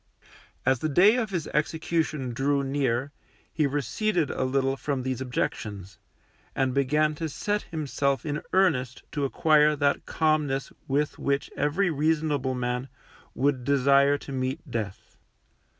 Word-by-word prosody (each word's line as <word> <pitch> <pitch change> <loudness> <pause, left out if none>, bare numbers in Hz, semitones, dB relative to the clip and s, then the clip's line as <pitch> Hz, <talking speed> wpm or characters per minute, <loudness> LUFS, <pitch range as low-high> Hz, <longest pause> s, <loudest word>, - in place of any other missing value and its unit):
As 130 -2 +3
the 155 - -1
day 190 - +6
of 225 -4 -1
his 175 -5 -2
execution 155 -4 -1
drew 140 +3 +1
near, 135 -1 -1 0.4
he 155 -3 +2
receded 145 - 0
a - - -2
little 135 +1 +1
from 135 -1 -3
these 130 -1 -3
objections, 105 -6 -4 0.6
and 130 -1 +1
began 150 +3 +2
to 160 +1 -4
set 205 +8 -1
himself 140 -3 -1
in 150 -1 -2
earnest 140 -10 +1
to 145 -2 -1
acquire 150 +2 +4
that 140 -1 0
calmness 150 -4 0 0.2
with 145 +2 0
which 140 0 -1
every 170 +6 +1
reasonable 150 -3 0
man 125 +1 -2 0.5
would 135 -1 +1
desire 140 +1 +4
to 140 - -10
meet 130 +3 -3
death. 105 -4 -5
140 Hz, 135 wpm, -26 LUFS, 130-155 Hz, 0.6 s, day